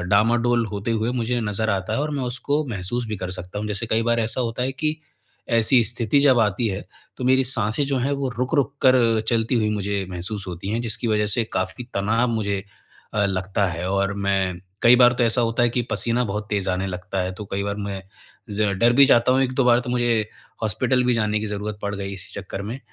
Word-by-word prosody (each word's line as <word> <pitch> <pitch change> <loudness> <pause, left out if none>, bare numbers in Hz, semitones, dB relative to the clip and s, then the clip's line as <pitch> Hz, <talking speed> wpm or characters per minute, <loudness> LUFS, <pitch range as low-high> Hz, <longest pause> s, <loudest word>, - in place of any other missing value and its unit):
डामाडोल 115 +5 +2
होते 105 +1 -4
हुए 115 +1 0
मुझे 120 0 -1
नज़र 110 0 -1
आता 95 -2 -1
है - - 0
और 150 +1 -1
मैं - - -2
उसको 140 +5 -1
महसूस 115 +3 -3
भी 110 - -3
कर 95 -1 -5
सकता 90 +2 -7
हूँ। 105 - -3
जैसे 105 +2 -3
कई 115 0 +1
बार 115 0 +1
ऐसा 115 +3 -2
होता 120 0 -2
है 130 +1 -1
कि, 155 +3 -2 0.5
ऐसी 115 +2 +4
स्थिति 120 +4 +1
जब 135 -3 +5
आती 105 +2 +1
है 95 0 -4 0.3
तो 125 - -5
मेरी 130 +1 +4
साँसें 120 +1 0
जो 135 -1 0
हैं, 135 +3 0
वो 140 -1 -1
रुक-रुक 140 +2 +1
कर 120 -4 +5
चलती 115 +1 +1
हुई 110 -3 +2
मुझे 100 -1 -1
महसूस 95 +3 -5
होती 90 +2 -6
हैं, 110 +3 -1
जिसकी 115 +1 -1
वज़ह 105 -1 +2
से 105 +3 +1
काफ़ी 95 +7 -2
तनाव 110 +5 +1
मुझे 100 -3 -1 0.5
अ, 105 -1 +2
लगता 95 +1 -1
है 85 0 -3
और 100 0 +1
मैं 95 -2 0 0.2
कई 120 +1 +7
बार 125 -1 +6
तो 120 - +4
ऐसा 115 +2 +2
होता 115 +1 +1
है 120 - +4
कि 120 +1 0
पसीना 120 +1 0
बहुत 105 0 -3
तेज़ 100 -2 -1
आने 90 +1 -1
लगता 95 +1 -4
है, 90 +1 -3
तो 105 +3 -8
कई 100 - -1
बार 100 0 -2
मैं 100 -2 -4 0.5
ज़रा 105 0 0
डर 115 +5 +3
भी 140 +3 +7
जाता 125 -2 +4
हूँ 130 +1 +3
1-2 130 0 +1
बार 120 -1 +5
तो 125 - -5
मुझे 120 -3 +1 0.3
हॉस्पिटल 125 +4 +1
भी 125 0 +2
जाने 105 -2 +1
की 110 - -3
ज़रूरत 105 0 -4
पड़ 100 0 -2
गई 100 0 -5
इसी 95 +2 -7
चक्कर 100 0 -6
में 110 +6 -5
110 Hz, 230 wpm, -23 LUFS, 100-120 Hz, 0.5 s, कई